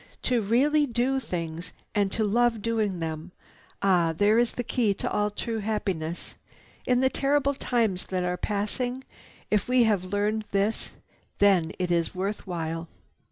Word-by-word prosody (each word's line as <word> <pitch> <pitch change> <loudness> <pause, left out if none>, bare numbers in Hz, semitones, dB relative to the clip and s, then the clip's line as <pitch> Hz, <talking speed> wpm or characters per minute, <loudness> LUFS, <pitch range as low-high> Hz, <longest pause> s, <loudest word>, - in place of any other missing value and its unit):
"To 245 -3 +2
really 285 +8 +3
do 250 +2 +1
things 170 -6 -5 0.2
and 200 -2 +1
to 220 - 0
love 230 +1 +2
doing 215 -6 0
them! 160 +2 -4 0.5
Ah, 175 -4 +3
there 210 +4 +4
is 240 -1 +2
the 245 - -3
key 225 -4 +1
to - - -3
all 210 0 +1
true 225 +2 -3
happiness! 190 -6 -3 0.5
In 250 0 +3
the 260 - +4
terrible 280 0 +2
times 230 -8 0
that 185 -1 -1
are 180 0 0
passing, 235 +7 -2 0.5
if 210 -2 +2
we 250 -1 +4
have 210 -5 +2
learned 205 +3 -1
this, 200 +3 0 0.4
then 190 -5 +4
it 180 -1 -1
is 170 +1 +1
worth 195 +3 -3
while." 165 -1 -3
205 Hz, 160 wpm, -27 LUFS, 180-240 Hz, 0.5 s, there